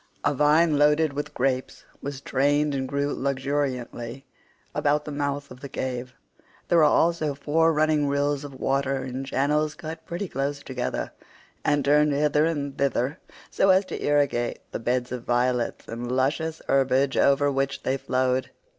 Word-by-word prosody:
A 145 - +3
vine 150 +2 +4
loaded 150 0 +3
with 145 +1 -5
grapes 130 0 -1 0.2
was 140 -1 -5
trained 145 +2 +1
and 135 -1 -2
grew 140 0 -1
luxuriantly 135 -2 -3 0.5
about 150 0 +1
the 150 - -5
mouth 145 0 -3
of 125 - -11
the 140 - -8
cave; 125 -1 -4 0.5
there 170 - +4
were - - +6
also 155 -1 +2
four 160 +3 +2
running 155 -1 +2
rills 140 0 0
of 140 -2 -9
water 135 0 0
in 130 +1 -4
channels 150 +3 0
cut 160 0 -7
pretty 175 +4 -3
close 140 0 -3
together, 125 -2 -3 0.5
and 145 -2 +1
turned 150 +1 +4
hither 150 +1 +2
and 145 -4 -3
thither 140 +2 0 0.3
so 195 - +2
as 190 +1 +5
to - - -6
irrigate 140 -5 +1
the - - -4
beds 125 +1 -1
of 125 -1 -4
violets 125 0 0
and 120 +2 -5
luscious 155 +5 -1
herbage 135 0 +2
over 140 +1 +3
which 135 0 -1
they 130 - +1
flowed. 130 -1 0
140 Hz, 160 wpm, -25 LUFS, 130-150 Hz, 0.5 s, were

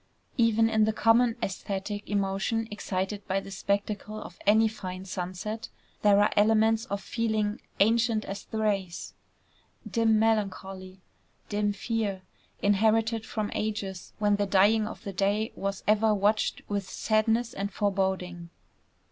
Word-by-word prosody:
Even 225 -2 +4
in 220 -1 +3
the 220 - +1
common 225 +2 +4
æsthetic 195 +1 -3
emotion 200 +3 0
excited 200 0 -3
by 190 +1 +1
the 195 - -10
spectacle 205 +2 -2
of - - -10
any 220 +2 +6
fine 185 -3 -6
sunset, 185 +4 -5 0.3
there 205 -1 +5
are 205 - +3
elements 220 +1 +4
of 200 - -3
feeling 220 -2 -1 0.2
ancient 225 +1 +3
as 195 +1 -6
the 220 - -6
race, 200 -5 -1 0.7
dim 225 +1 +3
melancholy, 195 -4 -1 0.5
dim 205 0 +1
fear, 200 -2 -2 0.4
inherited 220 +2 +2
from 215 -2 -3
ages 200 -4 -4
when 205 -1 +2
the 205 0 0
dying 210 +3 +4
of - - -9
the 200 - -5
day 205 +4 0
was 195 0 -3
ever 215 0 +4
watched 210 +2 +1
with 200 -2 -3
sadness 225 +2 +1
and 200 -2 -3
foreboding. 190 -4 -1
210 Hz, 135 wpm, -28 LUFS, 195-220 Hz, 0.7 s, any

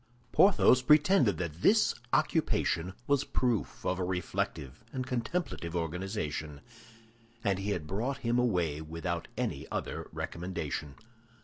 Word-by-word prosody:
Porthos 175 -9 +6
pretended 150 - +5
that 85 -1 -4
this - - +5 0.2
occupation 90 +3 +1
was 140 -1 +2
proof 120 -5 -1
of 90 0 0
a - - 0
reflective 90 - -3
and 130 -1 -3
contemplative 120 - -2
organization, 80 -4 -3 0.8
and 100 -3 +1
he 100 +1 -2
had 90 -7 -2
brought 115 - -2
him 120 +1 +2
away 90 -11 +1
without 85 +2 -4
any - - -2
other - - -4
recommendation. 80 -5 -4
95 Hz, 120 wpm, -31 LUFS, 80-125 Hz, 0.8 s, Porthos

